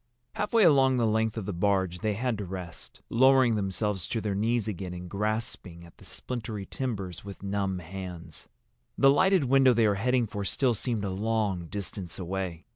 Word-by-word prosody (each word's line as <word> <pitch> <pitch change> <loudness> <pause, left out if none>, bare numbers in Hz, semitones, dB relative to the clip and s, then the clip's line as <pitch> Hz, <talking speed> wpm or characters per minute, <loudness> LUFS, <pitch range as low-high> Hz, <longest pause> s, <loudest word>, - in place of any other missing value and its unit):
Halfway 215 +1 +2
along 135 -6 +5
the 120 - +2
length 110 0 +1
of 110 - -3
the 100 - -3
barge 95 -1 +1
they 105 0 -1
had 120 -1 -1
to - - -3
rest, 90 -3 -8
lowering 130 0 +5
themselves 100 -2 -1
to 115 - -2
their 105 -2 -2
knees 115 +3 0
again 90 -3 -4
and 90 0 -7
grasping 100 -4 -3
at 85 - -18
the - - -15
splintery 110 -5 -5
timbers 100 -10 -4
with 100 -1 -10
numb 100 -1 -1
hands. 90 -2 -8 0.5
The 135 0 +6
lighted 190 +4 +4
window 135 -1 +5
they 115 -1 +4
were 105 - +3
heading 125 +4 +1
for 105 -1 -5
still 125 +5 +1
seemed 115 -2 -2
a 95 - -2
long 100 -3 -1
distance 95 -2 -6
away. 90 -2 -4
105 Hz, 185 wpm, -28 LUFS, 95-120 Hz, 0.5 s, The